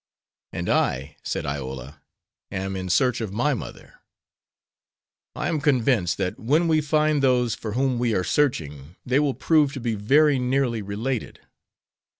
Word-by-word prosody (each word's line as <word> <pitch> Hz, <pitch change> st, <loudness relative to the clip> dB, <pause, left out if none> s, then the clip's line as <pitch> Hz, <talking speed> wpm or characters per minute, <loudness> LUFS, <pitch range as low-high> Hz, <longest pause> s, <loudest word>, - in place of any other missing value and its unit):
"And -, -, -4 dB
I," 70 Hz, +4 st, 0 dB
said -, -, -3 dB
Iola, 70 Hz, 0 st, -6 dB, 0.5 s
"am 95 Hz, 0 st, -3 dB
in 95 Hz, -1 st, -4 dB
search 125 Hz, +7 st, +2 dB
of 110 Hz, -4 st, -4 dB
my 125 Hz, +8 st, +1 dB
mother. 125 Hz, -, -8 dB, 1.4 s
I -, -, -2 dB
am 160 Hz, -4 st, -1 dB
convinced 125 Hz, -, +2 dB
that 90 Hz, -2 st, -3 dB
when 155 Hz, +9 st, +2 dB
we 160 Hz, -1 st, +3 dB
find 150 Hz, 0 st, +1 dB
those 125 Hz, -3 st, +2 dB
for 110 Hz, -2 st, -5 dB
whom 130 Hz, 0 st, 0 dB
we 120 Hz, -3 st, +1 dB
are 95 Hz, -, +1 dB
searching 80 Hz, -, -1 dB
they 130 Hz, +2 st, +2 dB
will 145 Hz, -3 st, +1 dB
prove 150 Hz, -4 st, +2 dB
to 135 Hz, -, -5 dB
be 115 Hz, -2 st, -2 dB
very 135 Hz, +7 st, +3 dB
nearly 125 Hz, -2 st, 0 dB
related. 110 Hz, +5 st, -4 dB
120 Hz, 155 wpm, -24 LUFS, 95-140 Hz, 1.4 s, we